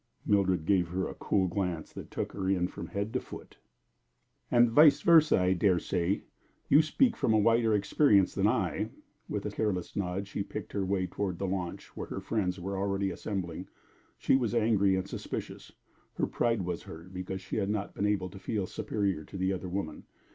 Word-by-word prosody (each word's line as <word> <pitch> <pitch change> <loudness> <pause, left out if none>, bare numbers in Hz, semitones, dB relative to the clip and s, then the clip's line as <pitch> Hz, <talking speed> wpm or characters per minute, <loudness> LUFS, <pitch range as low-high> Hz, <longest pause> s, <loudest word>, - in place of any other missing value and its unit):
Mildred 95 -5 +2
gave 90 -2 +3
her 95 +2 -2
a - - -6
cool 95 -2 0
glance 90 -3 -3
that - - -8
took - - -3
her 95 -1 -3
in 90 -2 +2
from - - -8
head 100 +2 -3
to - - +1
foot. - - -11 0.9
"And 120 -1 +5
vice 150 +4 +7
versa, 160 - +6
I 90 0 +3
dare 95 0 +3
say. 90 +2 -1 0.5
You 145 +3 +7
speak 230 - +2
from 110 - +2
a - - +5
wider 115 +1 +3
experience 100 -2 +3
than - - +2
I." - - 0 0.4
With 105 - -3
a 105 - -2
careless 100 -4 -2
nod 95 0 -2
she 100 - -4
picked 105 +2 -6
her 100 - 0
way 95 -1 0
toward 90 0 -3
the 100 - -2
launch, 90 -2 -4
where - - -5
her - - -5
friends 95 -5 -1
were 95 +2 -3
already 100 0 0
assembling. 95 -3 -4 0.5
She - - +3
was 120 -3 0
angry 105 -4 +3
and 95 0 -2
suspicious. - - -6 0.4
Her - - +1
pride 115 -5 0
was 90 -1 -3
hurt 85 +4 -11
because 95 +1 -5
she 95 - -5
had 100 -2 0
not 105 -1 -2
been 100 - 0
able 95 -3 0
to 95 - -10
feel 100 0 -2
superior 100 -5 -2
to - - -9
the 95 +1 +1
other 95 -1 -5
woman. 90 -5 -4
95 Hz, 200 wpm, -30 LUFS, 90-105 Hz, 0.9 s, vice